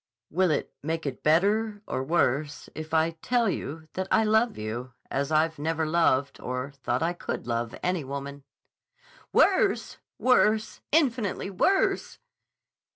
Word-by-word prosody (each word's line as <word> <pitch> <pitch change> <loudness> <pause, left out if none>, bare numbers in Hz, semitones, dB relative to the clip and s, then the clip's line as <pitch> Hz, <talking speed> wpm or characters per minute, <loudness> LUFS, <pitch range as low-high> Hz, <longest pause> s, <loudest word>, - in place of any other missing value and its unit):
"Will 185 +3 +2
it 155 - -1
make 160 +2 -3
it 135 -3 -4
better 205 +6 +2
or 130 - -2
worse 145 -1 0
if 155 0 -7
I 160 +1 +3
tell 240 -2 +2
you 160 -4 -4
that 190 0 -3
I 220 - +4
love 220 +2 +2
you 120 +4 -5 0.2
as 140 +2 -1
I 160 +1 +3
never 160 +1 0
loved 150 -4 +2
or 125 +2 -3
thought 130 -1 -2
I 170 +1 +1
could 175 - -5
love 115 -1 -2
any 180 -3 0
woman?" 140 +1 -6 0.9
"Worse! - - +3 0.2
Worse! 220 -4 +2
Infinitely 245 - +1
worse!" 380 - +1
160 Hz, 140 wpm, -27 LUFS, 140-200 Hz, 0.9 s, I